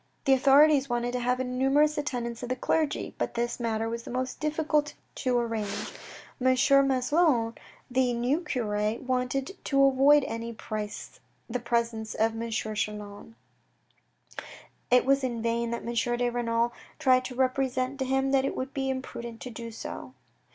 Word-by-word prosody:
The 270 - +5
authorities 275 +1 +5
wanted 240 0 -1
to 250 - -2
have 250 +1 0
a - - 0
numerous 270 +4 +2
attendance 245 -6 -3
of 245 - -5
the 255 - 0
clergy, 305 +4 -1
but - - -2
this 240 +2 -1
matter 225 -1 -1
was 230 +1 -3
the - - -10
most 255 +1 -3
difficult 305 -1 0 0.2
to 250 -2 0
arrange. 225 -4 -2 0.5
M. 260 0 +4 0.3
Maslon, 260 -2 +2 0.4
the 255 0 +2
new 245 +7 0
cure, 215 -7 -1
wanted 260 +6 -1
to 275 -1 +4
avoid 275 +2 +5
at - - -4
any 230 +1 -4
price 215 -2 -6 0.3
the 250 +1 -2
presence 235 -2 -1
of 225 +1 +2
M. 230 +1 -4
Chelan. 210 -1 -4 1.5
It 250 0 +5
was 275 0 +3
in 235 -3 -2
vain 235 0 0
that 235 - -4
M. 235 - -3 0.2
de 245 0 +1
Renal 235 0 0 0.2
tried 255 -4 +4
to 250 - -6
represent 260 +1 0
to 265 - 0
him 270 +1 +1
that 270 -1 +3
it 275 - -2
would 260 +1 -4
be 270 -1 -1
imprudent 235 -3 -5
to 250 - -6
do 230 0 -7
so. 225 - -8
250 Hz, 165 wpm, -28 LUFS, 230-270 Hz, 1.5 s, The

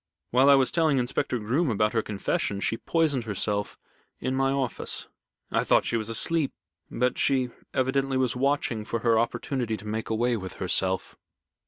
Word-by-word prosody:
While 130 +3 +5
I 140 - +9
was 135 -2 +3
telling 160 -4 +2
Inspector 125 0 0
Groom 125 +9 0
about 105 -1 +1
her 115 - +2
confession, 100 -1 -2
she 115 - 0
poisoned 145 -2 0
herself 105 0 -1 0.4
in 130 - -2
my 135 0 +2
office. 135 -3 -2 0.4
I - - +2
thought - - +3
she - - 0
was 110 -1 -1
asleep, 150 +6 +1 0.4
but 125 +1 0
she 130 -3 +2 0.2
evidently 135 +1 0
was 130 -2 +1
watching 130 -4 0
for 115 +1 -3
her 115 -2 +3
opportunity 120 0 -1
to 105 - -12
make 110 +1 -3
away 120 +2 +1
with 95 -3 -7
herself." 95 0 -1
125 Hz, 170 wpm, -27 LUFS, 110-135 Hz, 0.4 s, I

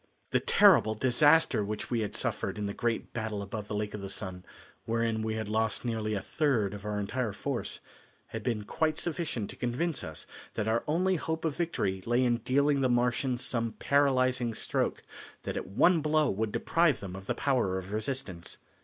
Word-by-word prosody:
The - - +3
terrible 110 0 +5
disaster 140 +1 +4
which 105 +3 -4
we 120 - +1
had 105 -2 -2
suffered - - -2
in 105 - -2
the 100 - -3
great 115 +1 -2
battle 110 -3 -3
above 105 +1 -6
the 105 - -4
Lake 105 0 -2
of 105 - -5
the 100 - -5
Sun, 90 -1 -6 0.4
wherein 115 -1 0
we 110 0 -1
had 110 -1 -3
lost 110 +2 0
nearly 110 -2 -1
a 100 - -3
third 125 - +1
of 100 0 -8
our 105 0 -1
entire 110 +2 -2
force, - - -4 0.5
had 115 - -5
been 110 -3 -1
quite 155 +8 0
sufficient 155 - -2
to - - -10
convince 140 +7 -1
us 80 -1 -6 0.3
that 110 -1 -1
our 115 +1 +1
only 180 +4 +2
hope 160 +1 -3
of 155 -3 0
victory 100 - -1
lay 120 +2 +3
in 120 -1 +3
dealing 140 +4 +2
the 130 - +3
Martians 125 +1 +1
some 115 -2 -1
paralyzing 130 -4 +2
stroke - - -1 0.4
that - - -4
at - - -4
one 160 - +4
blow 155 -1 +2
would 110 +2 -1
deprive 165 +1 +2
them 95 -3 -7
of 95 0 -9
the - - 0
power 120 -9 +1
of 95 +2 -6
resistance. 110 -6 -4
115 Hz, 195 wpm, -30 LUFS, 105-140 Hz, 0.5 s, terrible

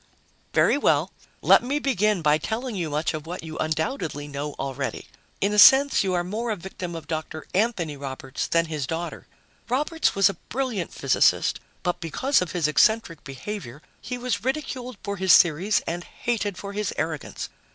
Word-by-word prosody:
"Very 285 - +4
well, - - +2 0.3
let - - +7
me 270 +4 -1
begin 215 - +1
by 150 0 +4
telling 230 - -3
you 170 -4 -2
much 150 +3 -1
of 155 0 -6
what 175 -1 -6
you 160 0 -7
undoubtedly 155 - -2
know 145 +1 -4
already. 135 0 -4 0.3
In 200 +1 +2
a 210 - +3
sense, 270 +4 +8
you 185 -2 0
are 175 - +1
more 220 +6 -3
a 215 - 0
victim 180 -2 -7
of 165 - -7
Dr. 155 -1 -5
Anthony 185 -7 0
Roberts 135 -1 -5
than 165 0 +2
his 155 -5 -4
daughter. 165 +3 -5 0.4
Roberts 300 +6 +1
was 195 0 +5
a 200 - 0 0.2
brilliant 240 -8 -2
physicist, 140 - +2 0.2
but 175 - -1
because 260 - +1
of 180 - -3
his 170 -4 +1
eccentric 165 +2 +2
behavior, 140 - -7 0.2
he 250 - -5
was 240 -5 -2
ridiculed 255 -3 -3
for 200 -1 -3
his 190 0 +7
theories 175 +5 +2
and 175 +1 -3
hated 210 -4 -3
for 200 +1 -7
his 210 -1 -2
arrogance. 155 -1 -3
180 Hz, 175 wpm, -25 LUFS, 155-225 Hz, 0.4 s, sense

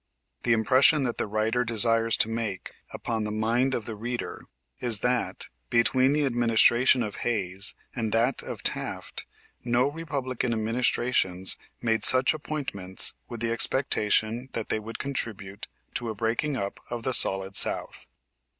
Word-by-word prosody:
The 120 - +1
impression 130 +6 +3
that 120 -3 -3
the - - 0
writer 110 +4 -1
desires 115 0 +2
to - - +3
make 115 -4 -5 0.2
upon 115 -2 -4
the 105 - -4
mind 115 +5 -1
of 115 - -5
the 115 - -5
reader 120 +3 -6 0.4
is 115 -4 +6
that, 125 0 -2 0.2
between 130 +3 +2
the 150 -1 +1
administration 120 0 +3
of 105 -2 -6
Hayes 95 -4 +1 0.2
and 115 -3 -3
that 115 +4 0
of - - -9
Taft - - -2 0.4
no 120 +2 +1
Republican 135 -6 -4
administrations 110 -4 +2 0.3
made 115 -1 0
such 130 +2 +6
appointments 130 -12 0 0.2
with 120 -2 -8
the 115 -1 -1
expectation 115 -1 +1
that 115 - -5
they - - 0
would 110 +2 -9
contribute 105 -8 -4 0.3
to 120 -2 -4
a 110 - -6
breaking 115 +7 -2
up 100 -4 -5
of 120 -1 -6
the 130 - 0
solid 95 -3 +3
south. - - +2
115 Hz, 150 wpm, -25 LUFS, 110-125 Hz, 0.4 s, is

